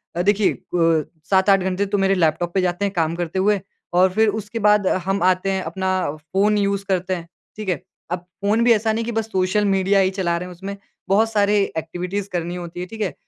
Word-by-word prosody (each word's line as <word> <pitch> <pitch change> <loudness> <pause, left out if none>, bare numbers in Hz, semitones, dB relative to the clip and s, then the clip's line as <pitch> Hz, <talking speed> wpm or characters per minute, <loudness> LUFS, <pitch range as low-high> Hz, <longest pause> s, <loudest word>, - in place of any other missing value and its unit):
अ, 175 - 0
देखिए 205 +2 +3
अ, 165 -3 +1 0.3
7-8 195 0 +4
घंटे 185 +2 -1
तो 200 +1 -1
मेरे 195 0 +2
लैपटॉप 170 0 +1
पे 190 - +2
जाते 180 +2 0
हैं 200 - -2
काम 165 -2 0
करते 175 +1 -3
हुए 205 +1 +3 0.3
और 185 +1 +5
फिर 220 +2 +3
उसके 220 +3 -6
बाद 210 -2 +3
अ, - - +2
हम 195 0 0
आते 185 +1 +2
हैं 190 0 -1
अपना 190 0 -2 0.2
फ़ोन 195 +7 +1
यूज़ 200 -1 0
करते 185 0 0
हैं, 170 -1 -8 0.3
ठीक 215 -2 -4
है? 175 -1 -1 0.3
अब 180 - -1 0.2
फ़ोन 210 +3 +2
भी 240 - +5
ऐसा 220 0 +1
नहीं 230 +1 -1
कि 235 - -3
बस 225 -1 -1
सोशल 190 +3 +1
मीडिया 195 0 +3
ही 190 -1 +3
चला 180 -3 -1
रहे 180 - -5
हैं, 180 - -10
उसमें 195 +3 -6 0.3
बहुत 220 +3 +3
सारे 205 -1 +3 0.2
एक्टिविटीज़ 180 +5 -4
करनी 175 0 -3
होती 175 -1 -7
हैं, 180 - -4
ठीक 225 +1 -8
है? 200 - -1
190 Hz, 230 wpm, -21 LUFS, 180-205 Hz, 0.3 s, और